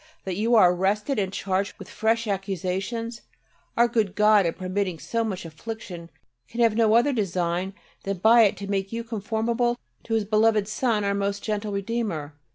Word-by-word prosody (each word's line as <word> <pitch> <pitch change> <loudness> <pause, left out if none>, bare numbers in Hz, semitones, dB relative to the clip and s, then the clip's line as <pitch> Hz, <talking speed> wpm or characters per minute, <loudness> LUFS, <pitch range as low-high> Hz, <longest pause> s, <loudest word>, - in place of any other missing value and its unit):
That 190 -2 -3
you 225 +5 +2
are 180 -5 +6
arrested 210 +8 0
and 190 -2 -1
charged 195 0 -2
with 195 - -10
fresh 225 +1 0
accusations! 195 +4 -3 0.6
Our 235 +1 +5
good 220 -5 0
God, 210 -3 +5
in 165 - -1
permitting 185 -1 -2
so 230 +8 -2
much 190 -5 -4
affliction, 175 0 -8 0.4
can 235 - -8
have 230 -2 +4
no 225 -1 +4
other 245 +5 +4
design 185 -3 -1 0.3
than 195 0 -3
by 225 +4 +6
it 200 - 0
to 200 - -6
make 195 -1 -2
you 230 0 -3
conformable 230 +2 -1 0.3
to 225 - -1
His 220 -2 +1
beloved 215 0 +3
Son 215 -1 0
our 200 0 +1
most 200 0 -2
gentle 210 -1 -2
Redeemer. 200 -8 -3
210 Hz, 175 wpm, -25 LUFS, 190-225 Hz, 0.6 s, are